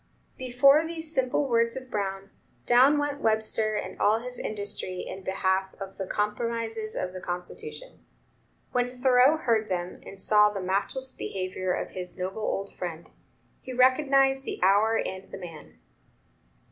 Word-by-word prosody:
Before 260 Hz, +4 st, +5 dB
these 325 Hz, -1 st, -2 dB
simple 265 Hz, +1 st, +1 dB
words 230 Hz, 0 st, +2 dB
of 255 Hz, -1 st, -9 dB
Brown, 195 Hz, -1 st, -3 dB, 0.3 s
down 260 Hz, +5 st, +6 dB
went 290 Hz, 0 st, -2 dB
Webster 220 Hz, 0 st, +1 dB
and 210 Hz, -, -5 dB
all 215 Hz, +2 st, +4 dB
his 250 Hz, +2 st, -7 dB
industry 200 Hz, -3 st, -2 dB
in 190 Hz, -, -7 dB
behalf 190 Hz, 0 st, 0 dB
of 195 Hz, -1 st, -8 dB
the 190 Hz, -, -3 dB
"compromises 225 Hz, +1 st, -2 dB
of 180 Hz, 0 st, -3 dB
the 185 Hz, -, -7 dB
Constitution." 420 Hz, -, -7 dB, 0.7 s
When 245 Hz, 0 st, +1 dB
Thoreau 260 Hz, +3 st, +5 dB
heard 225 Hz, -7 st, +1 dB
them, 180 Hz, -1 st, -3 dB
and 195 Hz, -, -11 dB
saw 210 Hz, +1 st, +5 dB
the 205 Hz, -1 st, -5 dB
matchless 200 Hz, +8 st, -1 dB
behavior 185 Hz, -3 st, -3 dB
of -, -, -3 dB
his 180 Hz, -1 st, -7 dB
noble 190 Hz, +3 st, -4 dB
old 200 Hz, -2 st, -2 dB
friend, 170 Hz, -2 st, -6 dB, 0.5 s
he 255 Hz, -, -7 dB
recognized 270 Hz, +1 st, +4 dB
the -, -, -5 dB
hour 210 Hz, +4 st, +4 dB
and 190 Hz, +1 st, -4 dB
the -, -, -7 dB
man. 170 Hz, -5 st, -11 dB
220 Hz, 150 wpm, -27 LUFS, 190-255 Hz, 0.7 s, down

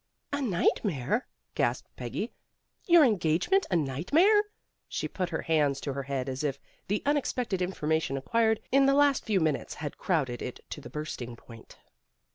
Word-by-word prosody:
"A 285 Hz, -, 0 dB
nightmare," 195 Hz, -, 0 dB, 0.3 s
gasped -, -, -1 dB
Peggy. -, -, -4 dB, 0.5 s
"Your 340 Hz, -3 st, +8 dB
en 220 Hz, -8 st, +3 dB
gagement 180 Hz, -, +2 dB
a 180 Hz, -, +1 dB
nightmare!" 285 Hz, -, +3 dB, 0.4 s
She -, -, -2 dB
put 185 Hz, -2 st, -3 dB
her -, -, -3 dB
hands 145 Hz, -4 st, +2 dB
to 140 Hz, -, -3 dB
her 140 Hz, -, -3 dB
head 135 Hz, -1 st, -3 dB
as 130 Hz, +2 st, -3 dB
if 140 Hz, -2 st, -1 dB, 0.3 s
the 205 Hz, +2 st, -1 dB
unexpected 250 Hz, -8 st, 0 dB
information 160 Hz, -5 st, 0 dB
acquired 220 Hz, +10 st, +1 dB
in 275 Hz, +1 st, +5 dB
the 275 Hz, -, +4 dB
last 285 Hz, -1 st, +3 dB
few 210 Hz, -4 st, +2 dB
minutes 155 Hz, -4 st, -1 dB
had 150 Hz, -2 st, -6 dB
crowded 135 Hz, -9 st, 0 dB
it -, -, -5 dB
to -, -, -5 dB
the -, -, -10 dB
bursting 130 Hz, -6 st, -5 dB
point. 115 Hz, -1 st, -14 dB
170 Hz, 165 wpm, -29 LUFS, -, 0.5 s, Your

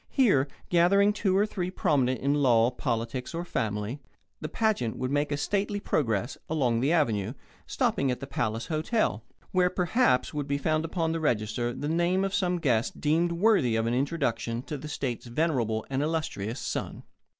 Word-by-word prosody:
Here, 190 Hz, -, +3 dB, 0.2 s
gathering 200 Hz, +4 st, +4 dB
two 195 Hz, -2 st, +1 dB
or 205 Hz, -, +4 dB
three 185 Hz, -4 st, -3 dB
prominent 130 Hz, -8 st, +1 dB
in 140 Hz, +1 st, +2 dB
law, 125 Hz, -5 st, +4 dB
politics, 125 Hz, +2 st, -3 dB
or 170 Hz, +1 st, -3 dB
family, 110 Hz, -2 st, -2 dB, 0.4 s
the 155 Hz, -, -5 dB
pageant 215 Hz, -, 0 dB
would 130 Hz, +1 st, -2 dB
make 145 Hz, +1 st, 0 dB
a 145 Hz, -, 0 dB
stately 205 Hz, +6 st, -1 dB
progress 120 Hz, -, -1 dB
along 130 Hz, -7 st, +1 dB
the 135 Hz, +6 st, +1 dB
Avenue, 115 Hz, -, +1 dB, 0.3 s
stopping 135 Hz, -, 0 dB
at 125 Hz, -, -1 dB
the 135 Hz, -, -6 dB
Palace 115 Hz, -4 st, -2 dB
Hotel, 155 Hz, -, 0 dB, 0.3 s
where, 180 Hz, -1 st, +3 dB
perhaps, 180 Hz, -, +1 dB
would 145 Hz, -2 st, -3 dB
be 140 Hz, 0 st, 0 dB
found 155 Hz, +2 st, 0 dB
upon 165 Hz, -1 st, -1 dB
the 165 Hz, -, -1 dB
register 120 Hz, -4 st, 0 dB
the 145 Hz, -, -4 dB
name 175 Hz, +4 st, +1 dB
of 195 Hz, 0 st, -2 dB
some 180 Hz, -3 st, +1 dB
guest 120 Hz, -9 st, 0 dB
deemed 165 Hz, +3 st, +2 dB
worthy 170 Hz, -, +3 dB
of 115 Hz, 0 st, +1 dB
an 115 Hz, -, 0 dB
introduction 125 Hz, -4 st, -1 dB
to 150 Hz, -, -5 dB
the 145 Hz, +2 st, -7 dB
state's 130 Hz, -5 st, -4 dB
venerable 120 Hz, -5 st, 0 dB
and 135 Hz, 0 st, -1 dB
illustrious 150 Hz, -8 st, -2 dB
son. -, -, -4 dB
145 Hz, 175 wpm, -28 LUFS, 120-170 Hz, 0.4 s, gathering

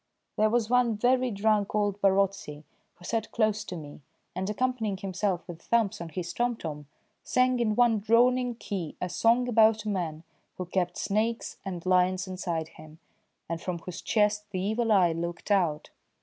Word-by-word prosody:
There 215 Hz, +1 st, +3 dB
was 230 Hz, -1 st, +1 dB
one 240 Hz, -2 st, +2 dB
very 250 Hz, +3 st, +2 dB
drunk 210 Hz, -1 st, +1 dB
old 205 Hz, -1 st, 0 dB
Barotse, 195 Hz, 0 st, +2 dB, 0.5 s
who 175 Hz, -, -15 dB
sat 225 Hz, +1 st, -2 dB
close 215 Hz, -2 st, +1 dB
to 180 Hz, -, -6 dB
me, 150 Hz, -3 st, -9 dB, 0.3 s
and, 190 Hz, +2 st, -2 dB
accompanying 220 Hz, -3 st, -1 dB
himself 190 Hz, -1 st, -2 dB
with 170 Hz, -2 st, -9 dB
thumps 215 Hz, -3 st, +1 dB
on 170 Hz, -, -6 dB
his 175 Hz, +2 st, -5 dB
tomtom, 165 Hz, -12 st, -3 dB, 0.4 s
sang 255 Hz, 0 st, +2 dB
in 215 Hz, -3 st, +1 dB
one 235 Hz, -2 st, +4 dB
droning 245 Hz, +3 st, +3 dB
key 190 Hz, -8 st, -5 dB
a 180 Hz, -, -3 dB
song 230 Hz, +7 st, +2 dB
about 220 Hz, -2 st, +4 dB
a -, -, -1 dB
man 165 Hz, -5 st, -3 dB, 0.3 s
who 185 Hz, -, -4 dB
kept 180 Hz, 0 st, -1 dB
snakes 220 Hz, +3 st, -1 dB
and 180 Hz, -3 st, -6 dB
lions 185 Hz, +1 st, +2 dB
inside 170 Hz, -4 st, -3 dB
him, 155 Hz, 0 st, -14 dB, 0.5 s
and 165 Hz, 0 st, -4 dB
from 180 Hz, -2 st, -3 dB
whose 170 Hz, +1 st, -8 dB
chest 210 Hz, -1 st, +1 dB
the 190 Hz, -3 st, -3 dB
evil 220 Hz, +4 st, 0 dB
eye 185 Hz, -5 st, +5 dB
looked 170 Hz, +4 st, -4 dB
out. 170 Hz, -7 st, +1 dB
200 Hz, 170 wpm, -28 LUFS, 180-225 Hz, 0.5 s, eye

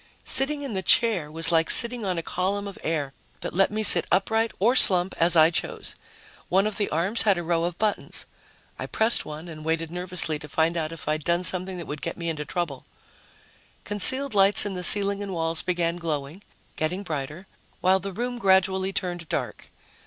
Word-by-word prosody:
Sitting 285 Hz, +2 st, +1 dB
in 270 Hz, -5 st, -6 dB
the 190 Hz, -, -3 dB
chair 190 Hz, -6 st, +2 dB
was 165 Hz, +1 st, 0 dB
like 165 Hz, -1 st, +1 dB
sitting 235 Hz, -1 st, +5 dB
on 185 Hz, -3 st, -2 dB
a 165 Hz, -, -3 dB
column 200 Hz, +4 st, -3 dB
of 200 Hz, -, -10 dB
air 150 Hz, -4 st, -3 dB, 0.3 s
that -, -, -6 dB
let 195 Hz, +2 st, +2 dB
me 215 Hz, +1 st, -3 dB
sit -, -, +3 dB
upright 220 Hz, +3 st, 0 dB
or 230 Hz, +6 st, +2 dB
slump 185 Hz, -6 st, +5 dB
as 170 Hz, +1 st, +3 dB
I 160 Hz, 0 st, +5 dB
chose. -, -, -3 dB, 0.5 s
One 190 Hz, +3 st, +2 dB
of 215 Hz, -1 st, -3 dB
the 205 Hz, -, -2 dB
arms 180 Hz, +9 st, +1 dB
had 200 Hz, -4 st, +2 dB
a 175 Hz, -, -4 dB
row 170 Hz, 0 st, -1 dB
of 175 Hz, 0 st, -5 dB
buttons. 215 Hz, -1 st, -1 dB, 0.5 s
I -, -, -5 dB
pressed 220 Hz, +2 st, +1 dB
one 155 Hz, +3 st, -9 dB
and 155 Hz, -2 st, -10 dB
waited 165 Hz, 0 st, -3 dB
nervously 180 Hz, -3 st, +1 dB
to 150 Hz, -, -10 dB
find 160 Hz, +3 st, 0 dB
out 160 Hz, -2 st, -3 dB
if 165 Hz, -, -10 dB
I'd 155 Hz, 0 st, -2 dB
done 170 Hz, +3 st, -1 dB
something 185 Hz, +1 st, +2 dB
that 170 Hz, -, -8 dB
would 145 Hz, 0 st, -7 dB
get 165 Hz, -, -5 dB
me 170 Hz, -1 st, -4 dB
into 150 Hz, -2 st, -5 dB
trouble. 150 Hz, -4 st, -5 dB, 1.0 s
Concealed 260 Hz, +7 st, +3 dB
lights 200 Hz, 0 st, +5 dB
in 205 Hz, -, -4 dB
the 180 Hz, -1 st, -6 dB
ceiling 200 Hz, +2 st, +5 dB
and 200 Hz, -2 st, -6 dB
walls 165 Hz, -1 st, -2 dB
began 175 Hz, -1 st, -2 dB
glowing, 155 Hz, 0 st, -5 dB, 0.4 s
getting 180 Hz, +5 st, -3 dB
brighter, 155 Hz, +1 st, -6 dB, 0.3 s
while 190 Hz, +1 st, +2 dB
the 195 Hz, +1 st, -7 dB
room 245 Hz, +5 st, -5 dB
gradually 190 Hz, -1 st, +1 dB
turned 175 Hz, -4 st, -4 dB
dark. -, -, -5 dB
180 Hz, 200 wpm, -24 LUFS, 165-200 Hz, 1.0 s, sitting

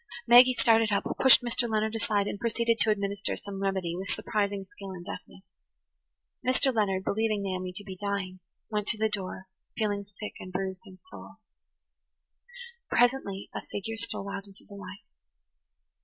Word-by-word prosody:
Maggie 250 Hz, +2 st, +8 dB
started 225 Hz, -2 st, +4 dB
up, 200 Hz, -, +2 dB, 0.2 s
pushed 265 Hz, -2 st, +8 dB
Mr. 240 Hz, 0 st, 0 dB
Leonard 220 Hz, 0 st, 0 dB
aside, 210 Hz, -2 st, +1 dB
and 205 Hz, -, -4 dB
proceeded 230 Hz, 0 st, +1 dB
to 220 Hz, -, +4 dB
administer 200 Hz, -1 st, -1 dB
some 195 Hz, -1 st, -7 dB
remedy 190 Hz, -3 st, -1 dB
with 190 Hz, +2 st, -5 dB
surprising 200 Hz, -2 st, -1 dB
skill 200 Hz, -8 st, -9 dB
and 180 Hz, -2 st, -8 dB
deftness. 190 Hz, -, -9 dB, 1.0 s
Mr. 255 Hz, +1 st, +3 dB
Leonard, 195 Hz, -4 st, +1 dB
believing 215 Hz, 0 st, 0 dB
Naomi 185 Hz, -1 st, -3 dB
to 195 Hz, +3 st, -9 dB
be 190 Hz, -2 st, -7 dB
dying, 195 Hz, -1 st, -3 dB, 0.3 s
went 210 Hz, -1 st, -1 dB
to 230 Hz, -, +2 dB
the 220 Hz, 0 st, +1 dB
door, 190 Hz, -2 st, -5 dB, 0.3 s
feeling 205 Hz, -2 st, -1 dB
sick 210 Hz, -, -5 dB
and 185 Hz, -, -8 dB
bruised 190 Hz, 0 st, -4 dB
in 185 Hz, -1 st, -13 dB
soul. -, -, -11 dB, 1.5 s
Presently 240 Hz, -6 st, +1 dB
a -, -, -4 dB
figure 225 Hz, +3 st, -4 dB
stole 200 Hz, -2 st, -2 dB
out 200 Hz, 0 st, -6 dB
into 195 Hz, 0 st, -17 dB
the 205 Hz, -, -13 dB
light. 200 Hz, 0 st, -9 dB
200 Hz, 160 wpm, -29 LUFS, 195-220 Hz, 1.5 s, Maggie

